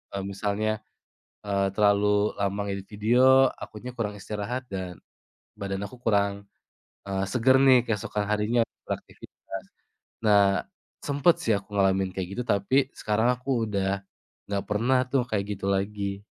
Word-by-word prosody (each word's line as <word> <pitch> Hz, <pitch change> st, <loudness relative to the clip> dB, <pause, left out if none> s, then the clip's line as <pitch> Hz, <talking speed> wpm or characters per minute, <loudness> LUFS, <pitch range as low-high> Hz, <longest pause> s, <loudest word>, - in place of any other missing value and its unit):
Eee, 100 Hz, -, -2 dB
misalnya, 105 Hz, +2 st, -1 dB, 0.7 s
eee, 100 Hz, -1 st, +1 dB
terlalu 105 Hz, 0 st, +3 dB
lama 100 Hz, 0 st, -1 dB
ngedit 100 Hz, -1 st, -4 dB
video, 125 Hz, +5 st, +5 dB
akunya 120 Hz, +4 st, -8 dB
kurang 105 Hz, -4 st, -3 dB
istirahat 110 Hz, +6 st, -4 dB
dan 95 Hz, -3 st, -6 dB, 0.6 s
badan 95 Hz, -1 st, -4 dB
aku 115 Hz, -, -13 dB
kurang, 100 Hz, -2 st, +1 dB, 0.6 s
eee, 95 Hz, -1 st, -1 dB
seger 125 Hz, +5 st, +4 dB
nih 135 Hz, -2 st, +7 dB
keesokan 105 Hz, -2 st, -2 dB
harinya 105 Hz, +3 st, +2 dB, 0.3 s
beraktivitas. -, -, -7 dB, 0.6 s
Nah, 100 Hz, -4 st, +4 dB, 0.4 s
sempet 145 Hz, +4 st, +3 dB
sih 115 Hz, -, +2 dB
aku 100 Hz, -, -8 dB
ngalamin 95 Hz, -1 st, +2 dB
kayak 95 Hz, -2 st, -3 dB
gitu -, -, 0 dB
tapi 100 Hz, +5 st, +1 dB, 0.2 s
sekarang 110 Hz, +2 st, +1 dB
aku 125 Hz, -1 st, -1 dB
udah 100 Hz, -1 st, -1 dB, 0.4 s
nggak 100 Hz, -1 st, -2 dB
pernah 115 Hz, +5 st, +2 dB
tuh 135 Hz, -1 st, +2 dB
kayak 105 Hz, -4 st, 0 dB
gitu 95 Hz, -, -5 dB
lagi. 100 Hz, 0 st, -2 dB
105 Hz, 135 wpm, -26 LUFS, 100-115 Hz, 0.7 s, nih